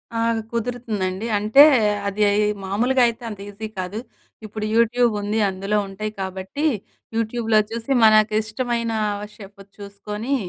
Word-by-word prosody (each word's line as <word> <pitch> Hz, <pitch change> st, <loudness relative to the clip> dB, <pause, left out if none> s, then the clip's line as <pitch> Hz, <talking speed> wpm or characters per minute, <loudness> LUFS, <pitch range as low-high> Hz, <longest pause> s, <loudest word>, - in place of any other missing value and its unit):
ఆ! -, -, 0 dB, 0.3 s
కుదురుతుందండి. 225 Hz, -4 st, -3 dB
అంటే 215 Hz, +8 st, +6 dB, 0.4 s
అది 200 Hz, +1 st, -3 dB, 0.4 s
మామూలుగా 245 Hz, +7 st, +1 dB
అయితే 235 Hz, +1 st, -5 dB
అంత 205 Hz, -2 st, -8 dB
ఈజీ 215 Hz, +2 st, -7 dB
కాదు. 185 Hz, +4 st, -4 dB, 0.5 s
ఇప్పుడు 215 Hz, 0 st, -5 dB
యూట్యూబ్ 235 Hz, 0 st, +3 dB
ఉంది, 210 Hz, +2 st, -1 dB
అందులో 195 Hz, +2 st, -2 dB
ఉంటాయి 210 Hz, +2 st, -5 dB
కాబట్టి 190 Hz, +10 st, -4 dB, 0.5 s
యూట్యూబ్‍లో 225 Hz, -1 st, +1 dB
చూసి 230 Hz, +3 st, -5 dB
మనకు 215 Hz, 0 st, +5 dB
ఇష్టమైన 230 Hz, +1 st, -2 dB, 0.3 s
ఓ -, -, -6 dB
షెఫుది 200 Hz, -1 st, -14 dB
చూసుకొని 210 Hz, +6 st, -4 dB
215 Hz, 125 wpm, -22 LUFS, 200-235 Hz, 0.5 s, అంటే